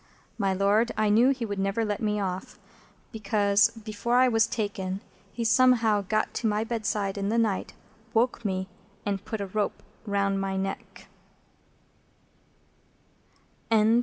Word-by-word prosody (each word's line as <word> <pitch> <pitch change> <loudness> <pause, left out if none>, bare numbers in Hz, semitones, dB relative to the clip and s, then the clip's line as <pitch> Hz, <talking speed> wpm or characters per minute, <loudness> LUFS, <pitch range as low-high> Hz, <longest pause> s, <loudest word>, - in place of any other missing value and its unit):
My 195 -2 +1
Lord, 200 +5 +2
I 215 -1 +2
knew 230 +5 +5
he 255 -4 -1
would 205 -2 -4
never 195 +4 0
let 205 -1 -2
me 210 -1 0
off, 185 -2 -4 0.5
because, 205 -2 +2
before 220 +1 -3
I 255 +1 +6
was 225 -2 +3
taken, 200 -4 -3 0.3
he 235 - -4
somehow 230 -3 +4
got 215 +2 -1
to 230 - -1
my 210 0 +1
bedside 215 -3 -2
in 200 0 -1
the 230 - +1
night, 220 -4 0 0.4
woke 235 +1 +1
me, 190 -2 -2 0.4
and 200 -1 -2
put 220 -2 -4
a - - -2
rope 205 +2 -2 0.2
round 200 -1 0
my 195 0 -2
neck." 195 0 -5
210 Hz, 140 wpm, -27 LUFS, 200-225 Hz, 0.5 s, I